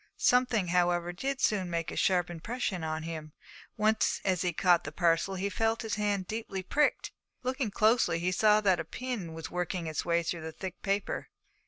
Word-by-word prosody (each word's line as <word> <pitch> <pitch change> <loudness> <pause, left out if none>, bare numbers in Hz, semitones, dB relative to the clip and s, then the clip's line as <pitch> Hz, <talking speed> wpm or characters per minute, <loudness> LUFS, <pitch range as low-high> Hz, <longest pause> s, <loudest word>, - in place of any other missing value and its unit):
Something, 245 -7 +3
however, 175 0 +2
did 270 +9 -3
soon 190 -4 +1
make 170 -1 -2
a - - -6
sharp 180 -2 +2
impression 185 +1 -3
upon 155 0 -3
him; 155 -2 -6 0.4
once 215 0 +2
as 185 -3 +1
he 180 - +1
caught 175 0 +3
the 145 - -6
parcel 170 +3 +1
he 190 +2 -1
felt 225 +3 0
his 220 - -3
hand 205 -2 0
deeply 215 -4 -4
pricked. 295 +9 +1 0.3
Looking 255 -2 -1
closely, 215 -3 +3
he 175 +2 0
saw 210 +2 +4
that 190 -4 +3
a - - -1
pin 210 -2 -5
was 160 -2 -7
working 180 0 -2
its 155 -2 -2
way 170 0 +1
through 165 0 -3
the 160 0 -5
thick 190 +2 -7
paper. 200 0 -2
185 Hz, 190 wpm, -30 LUFS, 170-215 Hz, 0.4 s, saw